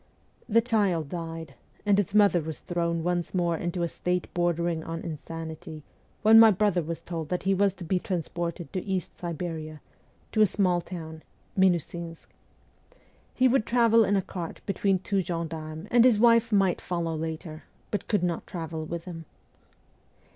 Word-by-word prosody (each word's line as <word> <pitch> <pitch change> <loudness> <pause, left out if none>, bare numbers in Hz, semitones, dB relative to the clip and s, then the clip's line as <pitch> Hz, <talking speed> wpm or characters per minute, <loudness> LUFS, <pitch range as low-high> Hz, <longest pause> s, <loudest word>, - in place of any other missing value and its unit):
The 230 +1 +5
child 200 - +1
died, 165 -2 -6 0.3
and 205 -1 +4
its 200 0 -1
mother 200 -5 +5
was 160 0 -6
thrown 170 -1 -1
once 175 +1 -1
more 175 -2 +1
into 175 +1 -2
a - - +1
state 180 +1 -2
bordering 170 -1 0
on 165 +1 -5
insanity 160 0 -7 0.4
when 220 +1 +8
my 225 0 +9
brother 200 -3 +2
was 165 +1 -5
told 165 -3 -5
that 180 - -2
he 195 +1 +2
was 195 0 +2
to 185 - -9
be 180 +2 0
transported 170 -3 -4
to 185 - -2
East 190 -2 -3
Siberia, 160 -2 -5 0.5
to 220 - +2
a 215 - +7
small 180 -3 +1
town, 160 -3 -8 0.3
Minusinsk. 170 -3 0 1.1
He 255 - +4
would 255 -3 +2
travel 230 -2 +5
in 205 -1 +2
a 195 - +1
cart 175 -3 -6
between 195 -1 +1
two 195 +1 -1
gendarmes, 165 -1 -5
and 240 -1 +6
his 245 -4 +5
wife 230 0 +5
might 195 -3 +2
follow 170 -2 -2
later, 160 0 -5 0.3
but 205 - -2
could 205 -5 +1
not 175 -2 -2
travel 160 -2 -5
with 170 +1 -5
him. 165 -3 -8
175 Hz, 165 wpm, -27 LUFS, 165-195 Hz, 1.1 s, my